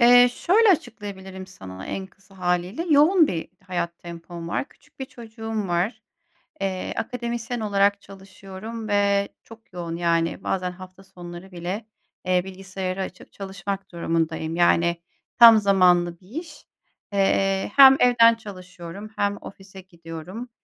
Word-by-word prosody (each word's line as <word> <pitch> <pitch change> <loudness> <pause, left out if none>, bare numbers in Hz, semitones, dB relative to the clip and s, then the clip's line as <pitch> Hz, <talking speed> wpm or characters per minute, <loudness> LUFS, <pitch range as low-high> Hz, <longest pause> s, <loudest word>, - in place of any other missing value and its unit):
Eee, 245 +1 +8
şöyle 425 - +3
açıklayabilirim 190 - -3
sana 95 - -10
en 190 -1 -4
kısa 195 0 -22
hâliyle: 180 - -1
Yoğun 310 +3 +6
bir 165 -3 -4 0.2
hayat 170 -2 -3
tempom 170 0 -9
var. 275 - -2
Küçük - - -26
bir 265 - -2
çocuğum 225 -4 -6
var. 195 +6 -1 0.6
Eee, 190 -1 -2
akademisyen 235 0 -3
olarak 200 -1 +2
çalışıyorum 195 +3 -9
ve 200 -1 +2
çok 225 -2 -16
yoğun, 170 -2 -5
yani, 170 +1 0
bazen 180 -1 -1
hafta 185 +1 -13
sonları 175 0 -11
bile, 180 +5 -5 0.4
eee, 180 -1 +2
bilgisayarı 190 0 -5
açıp 185 -1 -8
çalışmak 195 0 -6
durumundayım. 165 -1 -1
Yani, 170 0 +3 0.4
tam 230 -1 +10
zamanlı 180 -4 +3
bir 185 - -21
iş. 320 -4 -13 0.5
Eee, 195 0 +1
hem 270 -1 +9
evden 230 -2 +6
çalışıyorum 185 -2 -10
hem 205 0 0
ofise 195 0 -11
gidiyorum. 175 +5 -9
195 Hz, 130 wpm, -24 LUFS, 175-220 Hz, 0.6 s, tam